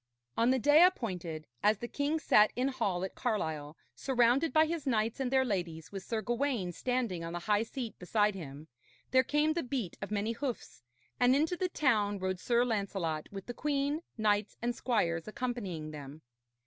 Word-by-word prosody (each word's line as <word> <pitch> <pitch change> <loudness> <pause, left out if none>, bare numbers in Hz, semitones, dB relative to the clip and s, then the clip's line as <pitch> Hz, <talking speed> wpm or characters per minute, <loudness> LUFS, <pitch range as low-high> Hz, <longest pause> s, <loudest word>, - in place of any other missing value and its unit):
On 230 +2 +3
the 260 - +4
day 295 +6 +6
appointed, 180 - 0 0.2
as 210 0 +4
the 235 - -5
king 285 +5 -1
sat 215 -8 +5
in 255 +2 +1
hall 205 -9 -1
at 190 - -4
Carlisle, 160 - -2 0.2
surrounded 260 +4 +2
by 315 0 +5
his 315 -3 -3
knights 225 -2 +1
and 265 -2 0
their 265 0 +3
ladies, 175 -7 -3
with 195 -1 -5
Sir 220 +2 -3
Gawaine 240 -6 -1
standing 235 -4 -2
on 165 0 -5
the 175 - -4
high 210 -1 +3
seat 230 0 -5
beside 210 +3 +2
him, 155 -4 -8 0.4
there 260 - +6
came 295 +4 +1
the 340 - -1
beat 245 - -3
of 195 - -4
many 210 +1 -1
hoofs, 245 - -5 0.4
and 250 +1 +5
into 315 +5 +1
the 365 0 -1
town 215 -11 +2
rode 185 -1 -2
Sir 240 +4 +2
Lancelot 195 -8 -2
with 195 -1 -7
the 245 - -5
queen, 290 +2 -1 0.2
knights 210 -1 +1
and 240 +1 -1
squires 170 -11 0
accompanying 210 -10 -4
them. 145 +1 -9
225 Hz, 185 wpm, -32 LUFS, 185-260 Hz, 0.4 s, day